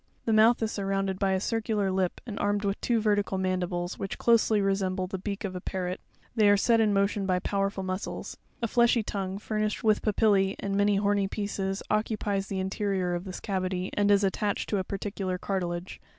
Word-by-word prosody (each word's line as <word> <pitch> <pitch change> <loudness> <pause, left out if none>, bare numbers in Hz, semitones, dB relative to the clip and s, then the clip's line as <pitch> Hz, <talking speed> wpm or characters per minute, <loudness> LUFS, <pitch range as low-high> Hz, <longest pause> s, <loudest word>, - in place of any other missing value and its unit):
'The 225 - +2
mouth 225 +2 +5
is 220 - -1
surrounded 195 -1 -1
by 195 -1 +2
a 190 - +1
circular 215 -2 0
lip, 185 -1 0
and 220 -4 -6
armed 205 0 0
with 195 0 -1
two 235 -2 +2
ver 210 -1 +3
tical 200 -2 -1
mandibles, 180 -1 -2
which 195 - -4
closely 230 -2 +3
resemble 195 -1 0
the 190 +1 -5
beak 200 +2 -4
of 190 -2 -4
a 180 - -5
parrot; 180 -1 -3 0.3
they 215 -3 +5
are 205 - +6
set 230 +3 +3
in 215 -2 +3
motion 200 0 +1
by 185 -1 +2
powerful 195 +1 -1
muscles. 185 +2 -4 0.3
A - - +2
fleshy 235 0 +3
tongue, 195 -2 -3
furnished 215 0 -2
with 215 -2 +3
papillee 200 -2 +2
and 200 - -3
many 205 0 +3
horny 200 0 +2
pieces, 195 -1 -3
occupies 210 -2 0
the 195 - -3
in 190 0 -2
terior 190 -4 -1
of 175 +2 -5
this 190 -1 -6
cavity, 185 -1 -2
and 205 0 +2
is 200 0 +5
attached 200 +1 0
to 205 - +1
a - - -1
particular 195 -1 -3
cartilage. 180 -2 -3
195 Hz, 205 wpm, -28 LUFS, 190-210 Hz, 0.3 s, are